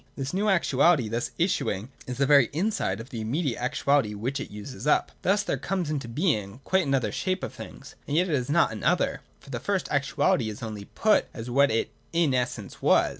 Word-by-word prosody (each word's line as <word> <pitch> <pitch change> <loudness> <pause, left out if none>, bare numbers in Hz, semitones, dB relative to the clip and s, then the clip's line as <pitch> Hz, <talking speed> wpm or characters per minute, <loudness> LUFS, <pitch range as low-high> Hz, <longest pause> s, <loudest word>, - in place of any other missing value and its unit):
This 135 +1 -4
new 205 +3 +1
actuality 155 - +3
thus 115 +2 -2
issuing 130 - 0 0.2
is 125 -1 -4
the 140 - +3
very 140 -3 +5
inside 160 - -1
of 115 +3 -9
the 115 -4 -4
immediate 130 +3 -1
actuality 130 -3 +1
which 130 +7 -3
it - - -6
uses 105 +8 -7
up. 150 - +3
Thus 200 +3 +2
there - - -1
comes 180 -5 -2
into 140 -5 -3
being 115 - -1
quite 190 -4 +1
an 135 - +2
other 130 - 0
shape 185 -1 -2
of - - -4
things, - - -10
and 145 - 0
yet 180 +2 +3
it 165 - -1
is 125 -3 0
not 170 +3 +3
an 110 -2 -7
other: - - +1 0.2
for - - -14
the - - -3
first - - -1
actuality 110 - +1
is 105 +3 -8
only 105 -3 -6
put 215 - +2
as 120 0 -6
what 140 +3 +4
it 115 +1 0 0.2
in 165 -5 +2
essence 125 -5 -3
was. - - +4
135 Hz, 220 wpm, -26 LUFS, 115-170 Hz, 0.2 s, very